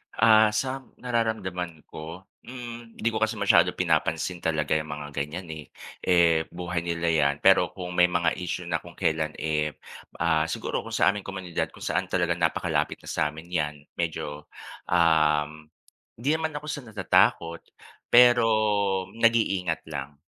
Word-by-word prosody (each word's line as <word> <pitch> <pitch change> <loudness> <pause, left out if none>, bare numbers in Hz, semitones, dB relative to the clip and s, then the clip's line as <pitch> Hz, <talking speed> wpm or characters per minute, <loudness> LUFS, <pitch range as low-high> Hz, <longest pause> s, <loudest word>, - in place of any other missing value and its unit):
Ah, 110 -1 +6
sa 130 +4 -1 0.2
nararamdaman 95 -9 -3
ko, 80 +4 -8 0.2
mm, 120 -2 -9
‘di 115 - 0
ko 110 - -2
kasi 110 +1 0
masyado 100 -1 +4
pinapansin 90 -1 0
talaga 80 -3 -1
yung 80 0 -4
mga 75 0 -7
ganyan 75 +5 -4
eh. 75 -1 -8 0.3
Eh, 85 -3 +3
buhay 90 0 -4
nila 85 0 0
'yan. 70 -3 +2
Pero - - +4
kung 90 -1 -6
may 90 0 +4
mga 85 -1 +1
issue 90 0 -3
na 80 -1 0
kung - - -14
kailan 80 -1 -1
eh, 75 -1 -1 0.4
ah, 80 -1 +1
siguro - - -3
kung - - -5
sa - - +4
aming 105 -1 -7
komunidad, 95 -3 -3
kung - - -11
saan 90 +4 -1
talaga 85 -1 0
napakalapit 80 -1 0
na - - -9
sa - - +1
amin 80 +3 -10
'yan, 75 -3 -1 0.2
medyo, 75 -3 -4 0.4
um, 75 -2 +2 0.5
hindi 120 +5 -2
naman 160 -1 -2
ako 145 +1 -5
sa 145 - -5
natatakot, 85 -5 +2 0.5
pero 120 -1 +7 0.7
nag-iingat 110 -7 +1
lang. 70 0 -6
85 Hz, 155 wpm, -26 LUFS, 80-110 Hz, 0.7 s, pero